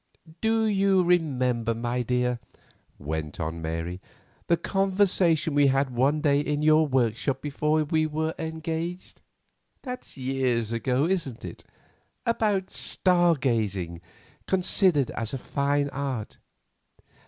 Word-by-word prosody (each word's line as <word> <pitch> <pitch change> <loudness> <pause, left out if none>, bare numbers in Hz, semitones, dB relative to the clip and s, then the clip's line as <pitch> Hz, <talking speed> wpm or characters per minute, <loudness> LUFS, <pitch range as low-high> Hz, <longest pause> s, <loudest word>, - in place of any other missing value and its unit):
"Do 225 0 +2
you 195 -3 +3
remember, 130 -10 +1
my 120 +2 -2
dear?" 125 0 0 0.6
went 75 +1 -5
on 80 0 -3
Mary, 80 +3 -4 0.5
"the 170 - +3
conversation 190 -5 +1
we 145 -1 +5
had 135 0 +1
one 135 +5 +1
day 145 -2 +3
in 150 0 -1
your 155 0 +5
workshop 130 0 0
before 150 +2 0
we 155 +1 +1
were 160 +1 -2
engaged—that's 165 - -7
years 130 -4 0
ago, 125 +4 +1
isn't 165 -10 -2
it—about 210 -5 -4
star 175 -2 +3
gazing 100 - -1 0.5
considered 180 - +2
as 115 +3 -3
a - - -2
fine 140 +2 0
art?" 135 -6 -4
145 Hz, 110 wpm, -26 LUFS, 120-170 Hz, 0.6 s, we